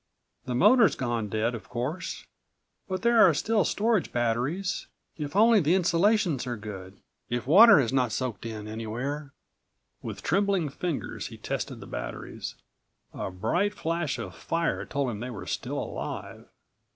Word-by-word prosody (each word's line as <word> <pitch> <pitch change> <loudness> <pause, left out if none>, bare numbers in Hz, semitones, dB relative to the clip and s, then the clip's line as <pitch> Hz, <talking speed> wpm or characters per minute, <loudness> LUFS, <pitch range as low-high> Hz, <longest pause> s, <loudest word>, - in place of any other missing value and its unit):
The 125 - -2
motor's 220 - +5
gone 120 -4 -2
dead, 110 +3 0
of 115 - -8
course, 130 +9 -4 0.6
but 185 -2 -3
there 235 -1 +5
are 170 -5 +7
still 215 +6 +2
storage 220 -2 +1
batteries. 125 +11 -1 0.3
If 150 0 -5
only 225 +1 +6
the 165 +1 +3
insulations 175 - +2
are 120 -2 -3
good. 100 -2 -8 0.3
If 120 -1 -2
water 195 - +8
has 130 -2 0
not 125 -3 +2
soaked 120 -4 -3
in 110 -2 -6
anywhere!" 120 +7 -4 0.7
With - - -7
trembling 195 -3 +1
fingers 160 +2 -4
he - - -10
tested - - -4
the - - -8
batteries. - - -6 0.6
A - - -4
bright 175 - 0
flash 165 -4 -1
of 90 - -6
fire 165 - -1
told 140 -3 -1
him 105 - -6
they 120 +3 -5
were 115 -6 -7
still - - -3
alive. - - -5
140 Hz, 150 wpm, -27 LUFS, 115-185 Hz, 0.7 s, water